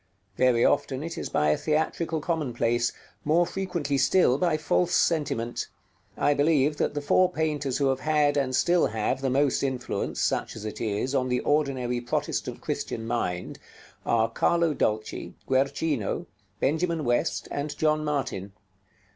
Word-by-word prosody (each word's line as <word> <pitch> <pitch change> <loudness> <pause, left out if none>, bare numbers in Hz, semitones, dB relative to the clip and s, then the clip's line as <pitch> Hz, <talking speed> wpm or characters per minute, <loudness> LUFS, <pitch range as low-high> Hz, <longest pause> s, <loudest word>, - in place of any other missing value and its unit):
Very 125 -1 +3
often 145 -1 +1
it 165 +1 -5
is - - -5
by 75 - +2
a 75 - +3
theatrical 160 +1 -1
commonplace, 120 -7 0 0.3
more 165 +4 +3
frequently 170 -7 -2
still 135 -1 +4
by 170 -4 +2
false 175 +3 +1
sentiment. 130 -8 0 0.5
I 145 - +3
believe 145 0 +2
that - - -1
the 145 - -2
four 185 +5 +3
painters 150 -5 -1
who 140 - +1
have 135 0 0
had, 150 -1 +2
and 135 -3 0
still 175 +4 +3
have, 110 +4 -1
the 135 - 0
most 140 +2 +2
influence, 130 -3 -2
such - - 0
as 110 -1 -7
it 110 - -6
is, 110 +4 -1
on 130 -2 +1
the 125 0 +1
ordinary 130 -5 0
Protestant 120 - -3
Christian 115 - -3
mind, 90 -7 -3 0.4
are 115 -1 +2
Carlo 170 +7 +1
Dolci, 110 -5 -2
Guercino, 135 -2 0 0.3
Benjamin 160 +1 0
West, 120 +7 0
and 145 +1 -3
John 155 -1 +2
Martin. 135 -10 -3
140 Hz, 150 wpm, -26 LUFS, 120-155 Hz, 0.5 s, still